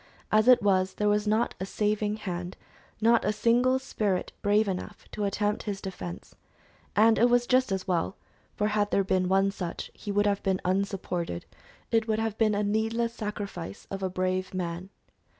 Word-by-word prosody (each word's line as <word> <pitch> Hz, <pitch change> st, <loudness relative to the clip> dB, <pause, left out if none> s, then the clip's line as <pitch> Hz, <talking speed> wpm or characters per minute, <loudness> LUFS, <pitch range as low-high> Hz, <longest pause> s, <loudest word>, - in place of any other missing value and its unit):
As 215 Hz, +2 st, +4 dB
it 250 Hz, -4 st, +7 dB
was 190 Hz, -2 st, +2 dB
there 210 Hz, -, 0 dB
was 210 Hz, 0 st, +2 dB
not 220 Hz, +3 st, +2 dB
a 190 Hz, -, -2 dB
saving 210 Hz, 0 st, 0 dB
hand 180 Hz, -4 st, -5 dB, 0.4 s
not 230 Hz, +1 st, +4 dB
a 210 Hz, -, +2 dB
single 240 Hz, +4 st, +3 dB
spirit 210 Hz, -8 st, -2 dB
brave 205 Hz, +1 st, +3 dB
enough 195 Hz, +2 st, -5 dB
to 210 Hz, -, -2 dB
attempt 205 Hz, +1 st, 0 dB
his 195 Hz, -1 st, -3 dB
defense; 90 Hz, -, -7 dB, 0.6 s
and 220 Hz, +2 st, +5 dB
it 240 Hz, +2 st, +5 dB
was 245 Hz, 0 st, +3 dB
just 255 Hz, -2 st, +2 dB
as 190 Hz, 0 st, -2 dB
well, 180 Hz, +1 st, 0 dB, 0.4 s
for 210 Hz, 0 st, +1 dB
had 210 Hz, -1 st, +1 dB
there 200 Hz, -, +2 dB
been 185 Hz, -1 st, +1 dB
one 195 Hz, +1 st, +3 dB
such, 180 Hz, -3 st, -5 dB
he 205 Hz, -, -6 dB
would 205 Hz, +1 st, +2 dB
have 200 Hz, -1 st, +1 dB
been 190 Hz, -2 st, 0 dB
unsupported; 185 Hz, -, -2 dB, 0.5 s
it 225 Hz, -1 st, +2 dB
would 215 Hz, -1 st, +1 dB
have 225 Hz, -1 st, -1 dB
been 215 Hz, -2 st, +3 dB
a 205 Hz, -, 0 dB
needless 225 Hz, +3 st, 0 dB
sacrifice 205 Hz, -5 st, -6 dB
of 195 Hz, 0 st, -4 dB
a 190 Hz, -, -1 dB
brave 185 Hz, +1 st, -2 dB
man. 175 Hz, +1 st, -4 dB
205 Hz, 185 wpm, -28 LUFS, 185-215 Hz, 0.6 s, it